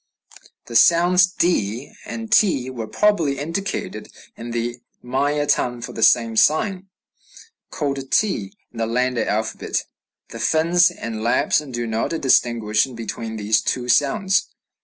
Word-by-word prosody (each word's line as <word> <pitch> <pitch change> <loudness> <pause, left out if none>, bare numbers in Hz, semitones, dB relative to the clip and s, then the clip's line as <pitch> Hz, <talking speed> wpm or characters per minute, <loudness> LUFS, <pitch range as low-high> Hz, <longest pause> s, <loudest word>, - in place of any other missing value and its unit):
The 115 - -9
sounds 175 +6 +5
d 135 - -1
and 225 -1 -6
t 140 - +3
were 115 -3 -6
probably 165 - +1
indicated 165 +8 -4 0.2
in 115 +1 -8
the 120 0 -3 0.3
Maya 145 +4 0
tongue 125 -4 0
by - - -7
the - - -6
same 115 -2 +4
sign, 185 - +2 0.8
called 140 -5 -3
t 115 - 0 0.2
in 115 - -10
the 115 - 0
Landa 125 +1 0
alphabet. 110 +1 -2 0.4
The - - -9
Finns 170 +2 +3
and 110 -1 -6
Lapps 115 +5 +2
do 125 -5 -5
not 115 +8 -2
distinguish 115 -4 +2
between 115 -2 -6
these 110 0 +1
two 125 -1 -2
sounds. 190 - +2
130 Hz, 135 wpm, -21 LUFS, 115-170 Hz, 0.8 s, sounds